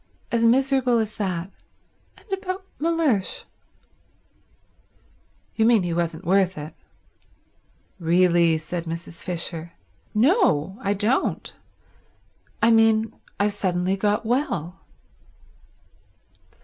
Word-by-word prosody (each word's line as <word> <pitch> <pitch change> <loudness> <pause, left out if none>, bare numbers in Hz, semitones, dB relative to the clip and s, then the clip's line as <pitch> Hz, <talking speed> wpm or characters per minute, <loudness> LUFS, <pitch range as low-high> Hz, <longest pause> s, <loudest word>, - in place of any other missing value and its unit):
As 235 -1 +1
miserable 260 0 +3
as 220 -1 -2
that. 185 -2 -3 0.7
And - - -20
about 380 0 -4
Mellersh." 310 - 0 2.1
"You 220 - +2
mean 225 -3 +4
he 175 -1 -2
wasn't 170 +1 -2
worth 190 0 +2
it." 150 +1 -7 1.3
"Really—" 170 -1 +3
said 165 +2 -5
Mrs. 165 0 -6
Fisher. 170 -1 -4 0.4
"No, 215 - +2
I 200 -2 0
don't. 220 +7 -1 1.1
I 230 - +6
mean 225 -1 +3 0.3
I've 205 0 +2
suddenly 185 -1 0
got 210 +2 0
well." 205 - -1
200 Hz, 95 wpm, -24 LUFS, 170-230 Hz, 2.1 s, I